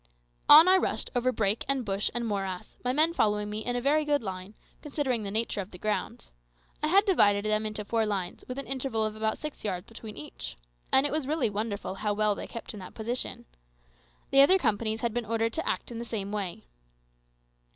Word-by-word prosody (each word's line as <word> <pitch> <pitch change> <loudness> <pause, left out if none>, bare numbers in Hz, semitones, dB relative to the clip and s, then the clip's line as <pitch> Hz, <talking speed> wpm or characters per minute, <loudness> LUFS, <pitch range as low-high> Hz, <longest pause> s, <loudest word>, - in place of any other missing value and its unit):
On 315 +4 +11
I 375 +1 +7
rushed - - -1
over 250 +1 +2
brake 215 -2 0
and 270 -3 0
bush 195 0 0
and 240 0 -1
morass, 195 -3 -4
my 250 - +1
men 310 +5 +4
following 210 -5 +1
me 215 +1 -3
in 245 - -2
a - - +1
very 295 +4 +3
good 290 -3 +1
line, 190 +1 -6 0.3
considering 275 -5 -1
the 200 - -4
nature 215 0 0
of 190 - -9
the 180 - -10
ground. 195 - -3 0.5
I 305 - +1
had 395 +6 +5
divided 205 - +4
them 215 0 +1
into 215 -1 -5
four 225 +1 +1
lines, 195 -4 -3
with 255 - -5
an 275 - -4
interval 260 -4 -1
of 215 0 -3
about 220 0 -1
six 305 -1 -7
yards 185 -3 -3
between 225 -2 -10
each. 145 - -7 0.3
And 265 - +5
it 290 - 0
was 300 -3 -1
really 285 -7 +1
wonderful 205 -1 -3
how 205 +1 -2
well 210 0 +2
they - - -7
kept 230 - -7
in 210 - -8
that 185 - -10
position. 235 +3 -3 0.9
The 275 - +7
other 365 +7 +7
companies 220 - 0
had 235 -2 -1
been 240 0 -1
ordered 225 +1 -1
to 325 - -2
act - - -3
in 230 - -5
the - - -4
same 210 -4 -4
way. 190 - -4
220 Hz, 215 wpm, -28 LUFS, 205-265 Hz, 0.9 s, On